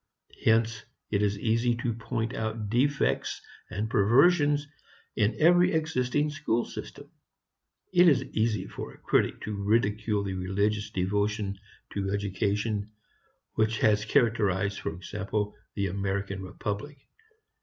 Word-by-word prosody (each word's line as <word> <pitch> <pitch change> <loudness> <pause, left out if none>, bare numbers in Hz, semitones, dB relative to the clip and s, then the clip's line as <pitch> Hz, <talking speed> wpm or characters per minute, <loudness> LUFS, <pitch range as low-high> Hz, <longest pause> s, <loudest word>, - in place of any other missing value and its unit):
Hence 115 0 +2 0.3
it 100 -1 +1
is 100 -1 +1
easy 115 +3 +1
to 120 0 -2
point 115 +1 -3
out 110 -4 -3
defects 135 +4 +1 0.3
and 105 +4 -2
perversions 145 - +4 0.5
in 105 0 +2
every 175 +3 +5
existing 150 -2 0
school 120 -6 0
system. - - -9 0.8
It 180 0 +7
is 140 -3 +3
easy 110 -6 -1
for - - -7
a - - -17
critic - - +1
to 105 - -4
ridicule 105 0 +1
the 95 -1 -3
religious 100 +3 -1
devotion 100 +1 -1 0.3
to 100 -1 -2
education 100 +1 -1 0.6
which 110 0 +1
has 105 -1 +4
characterized 100 -3 +1
for - - -3
example 105 +4 -3 0.2
the 100 - 0
American 100 0 -2
republic. 105 +8 -5
110 Hz, 125 wpm, -28 LUFS, 100-120 Hz, 0.8 s, It